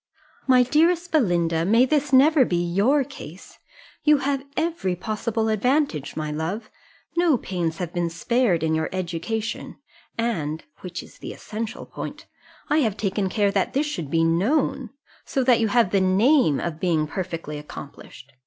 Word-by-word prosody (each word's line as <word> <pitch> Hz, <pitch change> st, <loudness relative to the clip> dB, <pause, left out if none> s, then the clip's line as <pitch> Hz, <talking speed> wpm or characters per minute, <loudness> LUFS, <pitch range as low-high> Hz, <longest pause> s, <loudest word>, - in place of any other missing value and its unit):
My 255 Hz, -1 st, +6 dB
dearest 335 Hz, +6 st, +2 dB
Belinda, 170 Hz, -, +2 dB
may 225 Hz, +8 st, +4 dB
this 290 Hz, 0 st, 0 dB
never 280 Hz, +2 st, +6 dB
be 180 Hz, -, -1 dB
your 200 Hz, +12 st, +2 dB
case! 190 Hz, -, -12 dB, 0.4 s
You 300 Hz, -1 st, +5 dB
have 275 Hz, -1 st, -1 dB
every 320 Hz, -, -1 dB
possible 220 Hz, +3 st, -2 dB
advantage, 220 Hz, -, 0 dB
my 155 Hz, -1 st, -3 dB
love: 170 Hz, +9 st, -4 dB, 0.4 s
no 340 Hz, -5 st, +3 dB
pains 175 Hz, -6 st, -3 dB
have 175 Hz, -3 st, -4 dB
been 175 Hz, -1 st, 0 dB
spared 185 Hz, 0 st, +1 dB
in 160 Hz, 0 st, +1 dB
your 160 Hz, 0 st, 0 dB
education, 185 Hz, +5 st, -4 dB, 0.4 s
and 165 Hz, -10 st, -2 dB, 0.2 s
(which 175 Hz, -2 st, -6 dB
is -, -, -17 dB
the -, -, -7 dB
essential 220 Hz, +1 st, -6 dB
point) -, -, -8 dB, 0.4 s
I 305 Hz, -, +2 dB
have 220 Hz, -8 st, 0 dB
taken 195 Hz, -1 st, -1 dB
care 205 Hz, 0 st, +1 dB
that 195 Hz, -1 st, 0 dB
this 285 Hz, +3 st, +1 dB
should 175 Hz, -, -4 dB
be 165 Hz, +2 st, +2 dB
known 225 Hz, -, +1 dB, 0.3 s
so 265 Hz, -, -1 dB
that 245 Hz, -2 st, +4 dB
you 225 Hz, -, +2 dB
have 220 Hz, -3 st, +2 dB
the 195 Hz, -, +3 dB
name 190 Hz, -, +4 dB
of 165 Hz, -2 st, -4 dB
being 165 Hz, -4 st, +1 dB
perfectly 165 Hz, -3 st, -5 dB
accomplished. 140 Hz, -2 st, -11 dB
200 Hz, 160 wpm, -24 LUFS, 170-260 Hz, 0.4 s, My